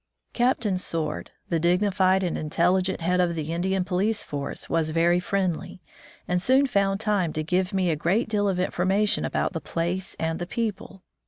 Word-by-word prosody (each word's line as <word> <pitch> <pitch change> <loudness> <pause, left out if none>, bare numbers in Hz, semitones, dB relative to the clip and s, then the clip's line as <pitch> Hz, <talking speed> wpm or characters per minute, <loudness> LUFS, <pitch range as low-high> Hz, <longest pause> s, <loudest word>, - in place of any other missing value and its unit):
Captain 235 -6 +1
Sword, 165 -3 -3 0.2
the 165 - +1
dignified 185 +2 +2
and 175 - -1
intelli 170 +4 +2
gent 185 -1 -2
head 180 +2 +1
of 175 -2 +2
the 160 0 -3
Indian 185 +2 0
police 200 +4 0
force, 140 -1 -5
was 165 -1 0
very 170 +2 +3
friendly, 185 -2 -2 0.5
and 180 0 +1
soon 260 +7 +4
found 200 -6 +1
time 205 -6 +1
to 155 - -2
give 180 +3 0
me 185 -3 +1
a - - +1
great 180 - +1
deal 205 -2 +1
of 185 -2 -1
information 190 +3 +1
about - - -1
the 165 - -4
place 175 +3 -3
and 160 0 -1
the 175 - -4
people. 200 -3 -4
185 Hz, 180 wpm, -25 LUFS, 170-195 Hz, 0.5 s, soon